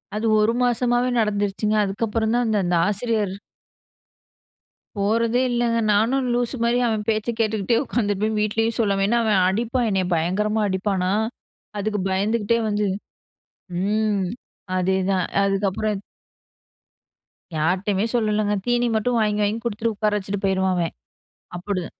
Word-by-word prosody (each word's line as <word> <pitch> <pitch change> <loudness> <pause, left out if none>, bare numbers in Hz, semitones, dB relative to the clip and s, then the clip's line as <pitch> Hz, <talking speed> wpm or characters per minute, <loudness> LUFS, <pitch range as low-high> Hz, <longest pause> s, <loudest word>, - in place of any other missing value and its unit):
அது 215 - -2 0.2
ஒரு 220 +2 +2
மாசமாவே 245 +1 +1
நடந்துருச்சுங்க 210 0 0
அதுக்கப்புறம் 220 +3 -1
தான் 245 0 +2
அந்த 215 -1 +1
அந்த 175 - +1
ஆசிரியர். 210 -2 -1 1.6
போறதே 230 +4 +1
இல்லங்க 235 -1 +1 0.2
நானும் 250 +5 +2
லூசு 245 +2 0
மாரி 235 +1 +2
அவன் 215 -2 -1
பேச்சக் 220 +1 -1
கேட்டுட்டே 220 +1 +1
உட்கார்ந்திருப்பேன் 215 -3 -1
வீட்டிலேயும் 225 +2 0
சொல்லாம 200 -3 +2
ஏனா 235 +2 +2
அவன் 205 -4 +3
அடிப்பான் 235 +4 0
என்னைய 190 -2 +1
பயங்கரமா 210 +7 0
அடிப்பானா 190 -1 0 0.7
அதுக்கு 210 -1 -1
பயந்துக்குட்டே 215 +4 +1
வந்து 210 0 0 1.0
ம். 210 -1 +1 0.5
அதேதான். 190 0 +1 0.2
அதுக்கு 200 0 +1
அப்புறம். 205 0 -2 1.5
யார்ட்டயுமே 190 +6 0
சொல்லலங்க. 215 -2 +1
தீனி 240 0 +2
மட்டும் 235 +3 +1
வாங்கி 210 0 +1
வாங்கி 210 +3 0
குடுத்துட்டு, 225 0 -1
உட்கார 210 +1 0
வச்சுட்டு 200 0 -4
போயிருவான் 190 -1 +1
அவன். 170 -1 -1 0.6
அப்டி 185 -1 -3
210 Hz, 125 wpm, -23 LUFS, 195-230 Hz, 1.6 s, அவன்